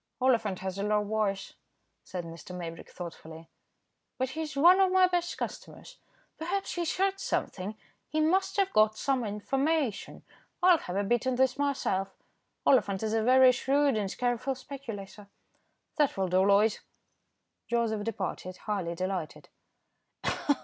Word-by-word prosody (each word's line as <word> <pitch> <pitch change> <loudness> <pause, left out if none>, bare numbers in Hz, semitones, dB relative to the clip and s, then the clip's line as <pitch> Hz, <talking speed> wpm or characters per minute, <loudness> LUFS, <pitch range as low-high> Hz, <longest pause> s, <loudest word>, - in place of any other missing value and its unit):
"Oliphant 230 -8 +1
has 190 0 -4
a - - -1
low 210 0 +2
voice," 205 -2 -1 0.5
said 180 -2 -5
Mr. 165 +2 -9
Maybrick, 165 -2 -7
thoughtfully, 165 -2 -9 0.7
"but 260 0 -1
he's 310 -1 -5
one 355 +6 +7
of 380 -1 +4
my 375 0 +6
best 350 -1 -1
customers. - - -7 0.4
Perhaps 380 +5 -2
he's 345 -2 -2
heard 390 +1 +1
something; 200 - -3 0.3
he 310 - -1
must 380 +5 +2
have 390 -1 +1
got 215 0 +4
some 270 -3 0
information. 265 +4 -1 0.4
I'll 360 -2 +6
have 180 - -6
a 200 - +1
bit 240 +4 +1
in 260 - +1
this 260 0 +2
myself. 275 -9 -1 0.5
Oliphant 200 -7 +3
is 215 0 -1
a 225 - +2
very 255 +2 +6
shrewd 275 +2 +2
and 205 -2 -2
careful 250 +2 0
speculator. 225 -7 -8 0.7
That 295 -8 +2
will 190 -1 0
do, 180 - +2
Loyd." 205 +2 +4 0.9
Joseph 230 -3 0
departed, 190 -4 -4
highly 190 -5 -2
delighted. 185 -2 -4
225 Hz, 140 wpm, -29 LUFS, 195-280 Hz, 0.9 s, one